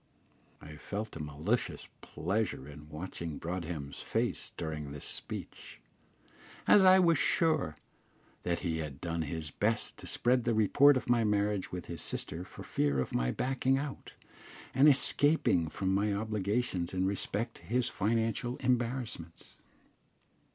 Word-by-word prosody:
I 75 0 -11
felt 105 +8 -5
a 80 - -5
malicious 75 +11 -2
pleasure 90 -3 -2
in 75 +1 -11
watching 80 0 -6
Broadhem's 80 -5 -5
face - - -1
during 75 -3 -4
this 70 0 -7
speech, - - -5 0.9
as 205 - +7
I 185 0 +8
was 170 -5 +4
sure 155 - +2 0.7
that 85 -1 -1
he 80 -3 -1
had 75 -3 -5
done 85 -1 -2
his 80 -1 -4
best 110 +6 -1
to - - -7
spread 125 0 +2
the 115 -1 +1
report 130 +6 +5
of 130 - -5
my 120 -1 +3
marriage 105 -2 0
with 90 -1 -5
his 85 -3 -5
sister 85 +3 -2
for - - -11
fear 70 -2 0
of 65 - -2
my - - +1
backing 130 - +1
out, 140 0 -6 0.6
and 135 +4 +7
escaping 140 - +4
from 95 +3 -1
my 100 +2 +2
obligations 100 -2 -1
in 95 0 +1
respect 105 +4 -2
to - - -17
his 125 +1 +1
financial 115 +2 0
embarrassments. 120 -9 -2
100 Hz, 145 wpm, -31 LUFS, 80-120 Hz, 0.9 s, I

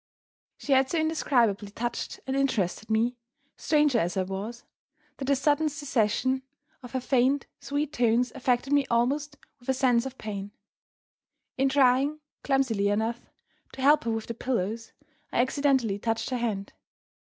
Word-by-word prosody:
She 280 - 0
had 265 0 +4
so 335 - -1
indescribably 245 -10 +1
touched 240 +3 -4
and 265 - -2
interested 225 -7 0
me, 230 +3 +1 0.4
stranger 295 -5 +2
as 175 +1 -1
I 190 - +2
was, 200 +6 -6 0.5
that 270 - -4
the 280 +1 +3
sudden 295 +3 +2
cessation 260 -3 0 0.4
of 245 0 -11
her 260 - 0
faint, 260 +2 +2
sweet 290 +1 -2
tones 240 +1 +2
affected 260 +1 0
me 285 -2 +3
almost 285 +5 0 0.2
with 245 - -12
a 265 - +3
sense 250 -1 +2
of 265 0 -10
pain. 205 -1 -6 1.0
In 270 +1 +2
trying 270 +2 +3 0.2
(clumsily 255 -7 +1
enough) 220 +3 -2 0.4
to 265 - -6
help 290 -2 +5
her 230 - 0
with 225 -1 -2
the 230 - -5
pillows, 225 -2 -2 0.4
I - - 0
accidentally 260 -5 +2
touched 225 +3 -2
her 255 - 0
hand. 205 -4 -3
250 Hz, 150 wpm, -27 LUFS, 225-275 Hz, 1.0 s, help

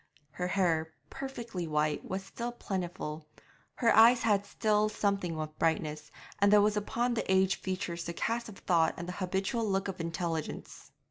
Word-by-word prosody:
Her 180 +3 -3
hair, 165 -4 +1 0.2
perfectly 235 -10 -5
white, 150 -1 0
was 190 +1 -4
still 235 +4 -5
plentiful; 175 -8 -4 0.5
her 230 -3 +3
eye 225 +3 +9
had 205 -4 +1
still 215 0 +2
something 200 -6 -1
of 155 0 -6
brightness, 155 -2 0 0.3
and 200 0 +5
there 210 - +8
was 210 +1 +3
upon 235 +4 0
the 225 - -1
aged 190 0 +3
features 185 -3 -3
the 170 - -4
cast 230 +6 -2
of 200 - -11
thought 165 -3 +2
and 175 - -6
the - - -3
habitual 190 +5 -1
look 195 0 0
of 190 -2 -4
intelligence. 165 -1 -4
190 Hz, 165 wpm, -31 LUFS, 165-210 Hz, 0.5 s, eye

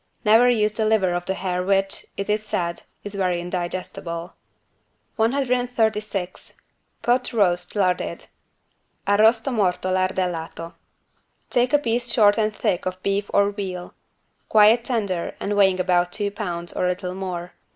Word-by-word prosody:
Never 225 +4 +6
use 215 -3 +2
the 215 +1 -1
liver 210 -5 +2
of 175 0 -2
the 190 - -2
hare 180 -2 -2
which, 195 +1 0
it 200 - -3
is 210 +1 0
said, 170 -5 -3 0.2
is 205 - -7
very 185 -3 0
indigestible. 175 -1 -5 0.8
136 225 -5 -1 0.5
POT 245 +2 +1
ROAST 180 -5 +1
LARDED 185 -3 0 0.8
(Arrosto 220 +5 +3
morto 185 -3 0
lardellato) 180 -3 -2 0.8
Take 245 +1 +2
a 290 - +6
piece 240 -3 -1
short 210 -1 +4
and 215 0 +1
thick 185 -4 -1
of 185 0 -5
beef 200 +1 -1
or 200 0 +3
veal, 185 -3 -6 0.6
quite 220 +2 +6
tender 200 -9 -2
and 205 - -2
weighing 190 -2 +4
about 180 -1 +2
two 205 0 -2
pounds 175 -4 -5
or - - -1
a - - +2
little 180 0 -3
more. 180 -2 -5
195 Hz, 140 wpm, -23 LUFS, 180-220 Hz, 0.8 s, Never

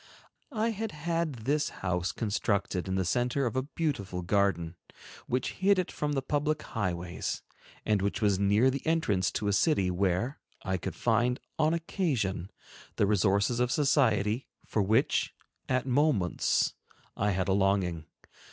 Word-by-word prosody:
I 225 +2 +1
had 220 -2 -4
had 155 -6 -2
this 145 +2 +1 0.2
house 90 0 0
constructed 100 -3 -1
in 95 - -1
the 95 -1 0
center 125 +7 +1
of 120 - -2
a 130 - +2
beautiful 130 - -3
garden, 85 -3 +1 0.5
which 125 +1 -1
hid 195 +1 +3
it 185 - -1
from 150 -1 -2
the 135 -2 -1
public 150 +2 0
high 105 -6 -2
ways, 85 0 -4 0.4
and 105 -3 +2
which 100 +1 -1
was 100 -3 +2
near 105 +6 +4
the 135 - -4
entrance 155 - +1
to 105 - -2
a 100 - +2
city 100 - +2
where 95 +8 0 0.2
I 95 0 -1
could 90 - -5
find, 120 +2 +1 0.2
on 155 +1 +3
occasion, 125 - -1 0.5
the - - +3
resources 100 +3 +2
of 125 0 +1
society, 125 -6 +2 0.2
for 110 - 0
which, 110 +8 +1 0.3
at 130 0 +1
moments, 130 - +2 0.4
I 105 - +1
had 95 -2 0
a 95 - +2
longing. 95 -4 +1
110 Hz, 155 wpm, -29 LUFS, 95-145 Hz, 0.5 s, near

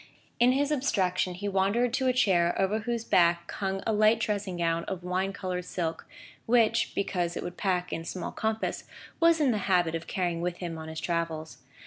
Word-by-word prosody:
In 245 +2 +5
his 285 +2 +1
abstraction 185 -10 0
he 205 +3 -4
wandered 200 +5 +1
to 260 0 +1
a - - +5
chair 180 -8 +2
over 195 +3 +1
whose 230 +1 -3
back 170 -1 +3
hung 195 -1 -3
a 220 - +1
light 215 +1 +4
dressing 205 -4 -2
gown 165 -1 0
of 185 -2 -5
wine 185 +2 -1
coloured 180 -2 -4
silk, 165 -3 -3 0.4
which, 230 -2 +3
because 180 -3 -1
it - - -4
would 175 - -6
pack 180 -3 -1
in 165 - -3
small 175 +1 -5
compass, 220 0 -2 0.3
was 335 -1 +5
in 285 -4 +3
the 215 - 0
habit 175 -3 +3
of 165 0 -4
carrying 175 -3 -1
with 175 0 -2
him 170 -3 -5
on 160 - -7
his 160 0 -5
travels. 165 -3 -3
185 Hz, 195 wpm, -28 LUFS, 175-220 Hz, 0.4 s, In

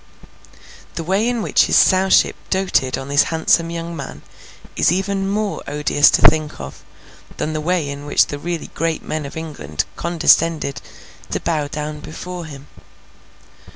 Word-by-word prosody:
The 165 - -3
way 195 +7 +1
in 240 -3 -1
which - - +3
his - - +1
Sowship 190 0 +4
doted 185 -9 +1
on 135 - -7
this 145 +1 +3
handsome 165 +1 +2
young 170 0 -5
man, 70 - -8 0.5
is - - +3
even 195 +1 -1
more 210 0 -2
odious 150 0 +3
to - - +1
think 155 -1 +4
of, 65 0 -9 0.5
than 155 - -2
the 155 - -2
way 170 -1 0
in 140 +1 -6
which - - +4
the 145 - -6
really 170 +2 -4
great 165 -1 -2
men 155 -2 -4
of 140 - -10
England 75 - -4
condescended 165 -3 +2 0.5
to - - -2
bow 155 -3 -1
down 150 +1 -5
before 175 +3 -7
him. 140 -3 -10
160 Hz, 155 wpm, -19 LUFS, 145-175 Hz, 0.5 s, Sowship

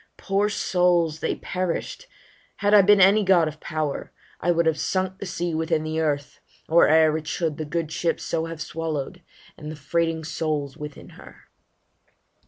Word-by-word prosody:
Poor 200 +2 0
souls! 175 -5 +1
they - - -1
perish'd 185 - -4 0.5
Had 205 0 +1
I 210 - +9
been 205 +1 +5
any 200 +3 +6
god 180 -4 +4
of 155 0 -7
power, 155 -2 -4 0.3
I - - -1
would 170 -1 +3
Have 160 -1 +1
sunk 190 0 -1
the 200 - -5
sea 175 -1 -3
within 160 0 0
the 155 0 -2
earth, 145 -2 -2 0.3
or 170 +2 +5
e'er 155 0 +5
It 155 - -13
should 160 -4 -2
the 155 - -4
good 160 +1 -3
ship 165 +1 -1
so 165 0 -2
have 165 -1 -6
swallow'd, 165 +1 -4 0.4
and 150 0 -7
The - - -7
freighting 160 +3 -1
souls 155 -3 -3
within 150 -1 -9
her. - - -16
165 Hz, 175 wpm, -24 LUFS, 155-180 Hz, 0.5 s, I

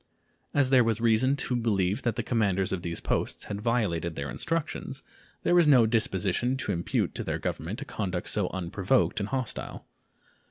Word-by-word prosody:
As 140 -2 +3
there 130 -2 +6
was 115 -1 0
reason 120 +4 +3
to 130 -2 -1
believe 100 -5 +1
that 120 - -1
the 120 - -2
commanders 100 -6 +1
of 95 - -2
these 85 -1 -3
posts - - -2
had 100 0 -5
violated 100 -8 0
their 70 0 -4
instructions, 160 -4 -3 0.4
there - - +2
was 175 -3 +5
no 130 -6 +7
disposition 110 +2 +1
to 130 -5 -2
impute 85 -2 -1
to - - -4
their - - -2
Government - - -4
a - - -13
conduct 90 -4 -3
so 100 -4 0
unprovoked 95 +8 0
and 100 0 -3
hostile. 130 -3 -4
110 Hz, 175 wpm, -28 LUFS, 95-125 Hz, 0.4 s, no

